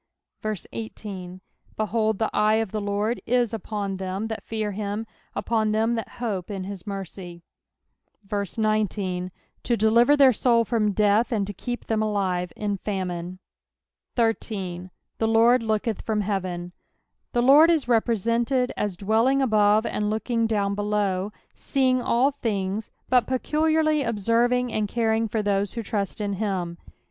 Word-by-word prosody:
18 190 Hz, -5 st, -7 dB, 0.4 s
Behold, 215 Hz, 0 st, 0 dB
the 220 Hz, -, 0 dB
eye 215 Hz, +1 st, +3 dB
of 220 Hz, -3 st, -1 dB
the 215 Hz, -, -2 dB
Lord 205 Hz, +3 st, -1 dB
is 240 Hz, -1 st, +2 dB
upon 205 Hz, -3 st, -3 dB
them 190 Hz, +3 st, -3 dB
that 220 Hz, -2 st, -4 dB
fear 215 Hz, -2 st, -3 dB
him, 205 Hz, +2 st, -3 dB, 0.3 s
upon 220 Hz, -2 st, 0 dB
them 225 Hz, +2 st, +2 dB
that 225 Hz, -2 st, -4 dB
hope 210 Hz, -7 st, -3 dB
in 195 Hz, -2 st, -4 dB
his 195 Hz, +1 st, -8 dB
mercy; 185 Hz, -3 st, -7 dB, 0.8 s
19 200 Hz, -3 st, -1 dB, 0.3 s
To 235 Hz, -, 0 dB
deliver 235 Hz, +7 st, +4 dB
their 270 Hz, -3 st, +7 dB
soul 230 Hz, 0 st, +3 dB
from 215 Hz, -2 st, +1 dB
death, 210 Hz, +4 st, +2 dB
and 210 Hz, -4 st, +1 dB
to 205 Hz, -, -5 dB
keep 245 Hz, +5 st, -5 dB
them 220 Hz, -1 st, 0 dB
alive 190 Hz, -5 st, -1 dB
in 205 Hz, -1 st, -2 dB
famine. 185 Hz, -3 st, -4 dB, 0.8 s
13. 195 Hz, -6 st, -1 dB
" -, -, -54 dB
The 225 Hz, -, +2 dB
Lord 230 Hz, +2 st, +5 dB
looketh 220 Hz, -1 st, -1 dB
from 215 Hz, -2 st, -1 dB
heateny 185 Hz, -3 st, -3 dB, 0.6 s
The 240 Hz, -1 st, +2 dB
Lord 290 Hz, +6 st, +7 dB
ia 335 Hz, -, +5 dB
represented 235 Hz, +2 st, +1 dB
as 205 Hz, -4 st, -2 dB
dwelling 225 Hz, +7 st, +2 dB
above 215 Hz, -4 st, +4 dB
knd 210 Hz, 0 st, -1 dB
looking 225 Hz, +1 st, 0 dB
down 200 Hz, -3 st, 0 dB
below; 205 Hz, -1 st, -1 dB, 0.2 s
sceiDZ^ll 255 Hz, 0 st, +2 dB
things, 205 Hz, -1 st, -2 dB, 0.2 s
but 250 Hz, -2 st, +3 dB
peculiarly 310 Hz, +3 st, +1 dB
observing 235 Hz, +2 st, +1 dB
ana 215 Hz, -1 st, 0 dB
coring 225 Hz, 0 st, +1 dB
for 215 Hz, 0 st, -1 dB
those 200 Hz, -1 st, 0 dB
who 230 Hz, -, -4 dB
trust 200 Hz, -2 st, -3 dB
in 205 Hz, -1 st, -1 dB
him. 185 Hz, -4 st, -2 dB
215 Hz, 145 wpm, -25 LUFS, 200-230 Hz, 0.8 s, their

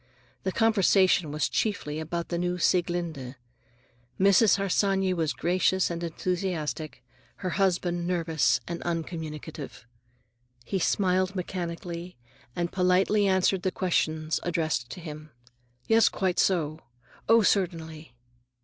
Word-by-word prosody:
The 190 Hz, -, -2 dB
conversation 195 Hz, -6 st, +3 dB
was 150 Hz, +1 st, 0 dB
chiefly 155 Hz, -8 st, -2 dB
about 170 Hz, +2 st, -4 dB
the 170 Hz, -, -2 dB
new 180 Hz, 0 st, -1 dB
Sieglinde. 170 Hz, -7 st, -1 dB, 0.8 s
Mrs. 200 Hz, +2 st, +5 dB
Harsanyi 195 Hz, -1 st, +1 dB
was 160 Hz, -4 st, 0 dB
gracious 185 Hz, +1 st, +1 dB
and 170 Hz, 0 st, -4 dB
enthusiastic, 165 Hz, -5 st, -3 dB, 0.4 s
her 185 Hz, -, 0 dB
husband 175 Hz, -2 st, 0 dB
nervous 165 Hz, -4 st, +1 dB
and 170 Hz, 0 st, -5 dB
uncommunicative. 160 Hz, -5 st, -5 dB, 0.8 s
He 190 Hz, -, -1 dB
smiled 185 Hz, +1 st, +1 dB
mechanically, 175 Hz, -1 st, -5 dB, 0.4 s
and 175 Hz, 0 st, -2 dB
politely 190 Hz, +3 st, +3 dB
answered 190 Hz, 0 st, +2 dB
questions 160 Hz, -3 st, 0 dB
addressed 160 Hz, -8 st, -1 dB
to -, -, -8 dB
him. 155 Hz, -1 st, -8 dB, 0.6 s
"Yes, 225 Hz, -1 st, +5 dB
quite 185 Hz, -2 st, -1 dB
so." 160 Hz, -5 st, +1 dB, 0.5 s
"Oh, 225 Hz, 0 st, +6 dB
certainly." 160 Hz, -, -1 dB
175 Hz, 110 wpm, -27 LUFS, 160-190 Hz, 0.8 s, Oh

